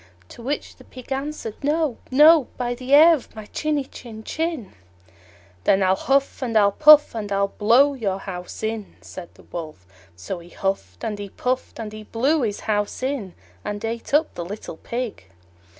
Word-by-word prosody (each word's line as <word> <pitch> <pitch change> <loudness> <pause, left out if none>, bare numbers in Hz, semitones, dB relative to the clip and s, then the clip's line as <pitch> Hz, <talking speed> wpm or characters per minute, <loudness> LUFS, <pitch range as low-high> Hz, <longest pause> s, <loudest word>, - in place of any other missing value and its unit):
To - - -12
which 275 +5 -4
the - - -15
Pig 255 0 -13
answered, 270 -4 -3
"No, 300 -3 0
no, 300 +2 +6
by 245 -1 -1
the 250 +1 -9
hair 310 +4 +8
of 290 -7 -5
my 215 -1 -8
chinny 300 +5 -1
chin 225 -4 -11
chin." 320 - -3 0.9
"Then 195 0 +4
I'll 190 0 +3
huff 275 +6 0
and 235 -4 0
I'll 200 -1 +5
puff, 300 +5 +7
and 210 -3 -5
I'll 200 0 +1
blow 240 +8 +4
your 205 -8 -2
house 180 0 -8
in!" 220 -2 -4
said 175 -2 -9
the - - -18
Wolf. 155 - -8 0.3
So 95 - -6
he 170 0 -14
huffed 130 - -3
and 210 -1 -3
he 200 -1 -6
puffed, 255 +5 -3
and 215 -2 -6
he 215 - -8
blew 265 +8 +1
his 210 -4 -2
house 205 +3 -2
in, 260 -9 -3 0.3
and 205 +1 -4
ate 230 +1 -5
up 300 +3 +2
the 175 - -5
little 190 -2 -7
Pig. 235 - -5
225 Hz, 180 wpm, -23 LUFS, 200-275 Hz, 0.9 s, hair